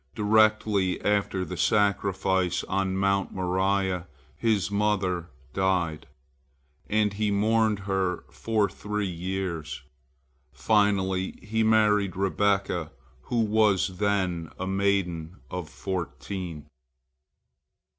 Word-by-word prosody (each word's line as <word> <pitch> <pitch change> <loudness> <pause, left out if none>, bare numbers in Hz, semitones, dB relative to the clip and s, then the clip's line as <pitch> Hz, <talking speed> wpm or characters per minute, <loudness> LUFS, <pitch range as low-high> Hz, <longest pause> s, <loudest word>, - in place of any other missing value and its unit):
Directly 105 -3 +3
after 100 -2 +1
the - - -6
sacrifice 95 -3 +1
on 95 0 -1
Mount 100 0 +1
Moriah, 95 0 0 0.3
his 100 +2 +1
mother 95 -4 0 0.2
died, 90 -5 0 0.8
and 105 -1 +2
he 105 +1 0
mourned 110 0 +2
her 95 -3 -1
for 110 -3 0
three 105 +2 -3
years. 90 -3 -4 0.7
Finally 95 -3 +1
he 110 +2 -1
married 105 -3 +3
Rebekah, 95 -3 0 0.4
who 120 -1 0
was 105 -4 +2
then 95 -6 0
a 95 - -3
maiden 95 -4 0
of 90 -4 -5
fourteen. 80 +3 -5
95 Hz, 95 wpm, -27 LUFS, 90-105 Hz, 0.8 s, Directly